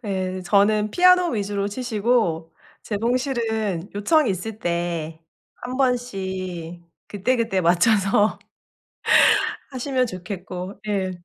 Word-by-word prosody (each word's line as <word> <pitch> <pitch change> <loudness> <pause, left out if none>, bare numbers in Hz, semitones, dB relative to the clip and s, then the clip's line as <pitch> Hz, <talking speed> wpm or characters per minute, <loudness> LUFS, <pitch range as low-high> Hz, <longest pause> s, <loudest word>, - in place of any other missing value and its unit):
네 185 -2 -3
저는 210 +3 +2
피아노 365 +2 +5
위주로 200 -2 -2
치시고 210 -8 -1 0.3
재봉실은 220 -5 -1
요청이 250 +6 +2
있을 205 +4 -4
때 170 -3 -3 0.4
한 250 +1 -5
번씩 190 -9 -2 0.3
그때그때 225 -1 0
맞춰서. 195 +4 +3 1.3
하시면 255 0 -1
좋겠고. 185 -1 -7
예. 190 -2 -1
205 Hz, 210 characters per minute, -23 LUFS, 185-235 Hz, 1.3 s, 피아노